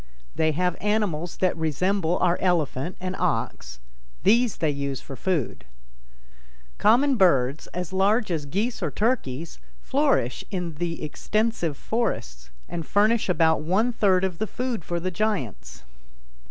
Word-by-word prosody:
They 155 -1 +1
have 180 +2 0
animals 200 -6 -1
that 185 -1 +1
resemble 170 +3 0
our 180 -1 +2
elephant 170 -3 0
and 185 0 -3
ox; 115 - -2 0.4
these 230 +1 +3
they 155 -2 +1
use 140 -2 -3
for 135 - -9
food. 160 - -2 1.2
Common 255 +5 +4
birds, 140 - +3
as 180 0 -5
large 205 +2 +2
as 150 -4 -2
geese 210 - -2
or 170 - 0
turkeys, 165 - -1 0.2
flourish 65 - +1
in 180 -4 -3
the 165 +1 -4
extensive 190 - -1
forests 65 - -3 0.2
and 170 -1 -4
furnish 210 +4 +2
about 160 -3 +3
one 200 +10 +1
third 190 -4 +3
of 185 -3 -2
the 220 - -1
food 245 -4 -3
for 175 +1 -2
the 185 +2 -2
giants. 115 - -3
180 Hz, 140 wpm, -25 LUFS, 150-205 Hz, 1.2 s, Common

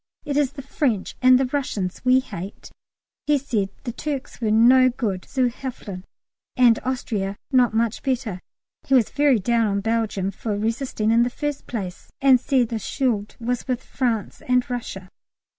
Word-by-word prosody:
it 290 -2 -2
is 280 -2 +1
the 275 -2 -8
French 255 -7 -1
and 255 0 +7
the 265 - +2
Russians 250 -9 -3
we 255 +1 +5
hate." 200 -5 -8 0.6
He 295 -1 +4
said 220 -8 -1
the 245 - -3
Turks 275 0 -5
were 220 - +1
no 250 +4 +6
good 215 -7 -3
zu 260 -2 +2
helfen, 220 -7 -7 0.5
and 240 -3 +5
Austria 215 -6 -2
not 250 -4 +3
much 230 0 0
better. 245 -8 -2 0.5
He 270 - +4
was 240 -5 +4
very 285 -3 +3
down 230 +2 +1
on 200 -1 0
Belgium 215 -3 -1
for 205 +1 -3
resisting 225 0 -1
in 230 +1 +5
the 240 - +2
first 295 +2 -4
place! 190 -6 -6
and 265 -2 +6
said 255 -2 +1
the 230 - -2
Schuld 215 -1 -1
was 245 +2 -2
with 255 -1 -2
France 235 -5 -2
and 250 0 +2
Russia. 195 -6 -5
240 Hz, 170 wpm, -23 LUFS, 215-260 Hz, 0.6 s, and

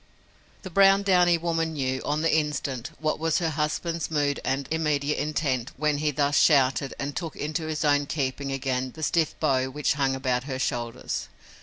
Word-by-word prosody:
The 190 - -7
brown, 195 +2 +5
downy 180 -3 +4
woman 165 -1 -1
knew, 130 -3 -2
on 150 +2 -1
the 165 - +3
instant, 145 -5 -2
what 155 -1 -1
was 165 0 +1
her 165 -2 0
husband's 155 +2 -2
mood 145 -3 0
and 135 +1 -1
immediate 150 -2 0
intent 140 -5 -1
when 150 0 +1
he 155 0 +1
thus 145 0 +2
shouted 135 -2 +3
and 140 0 -4
took 165 -3 -4
into 155 +2 -3
his 155 0 -2
own 145 -1 +3
keeping 140 -2 -2
again 130 -1 -2
the 160 - -7
stiff 160 0 0
bow 130 -1 +1
which 150 +2 0
hung 135 -2 0
about 130 -1 -1
her 135 -2 -4
shoulders. 120 -2 -3
145 Hz, 180 wpm, -26 LUFS, 135-160 Hz, -, brown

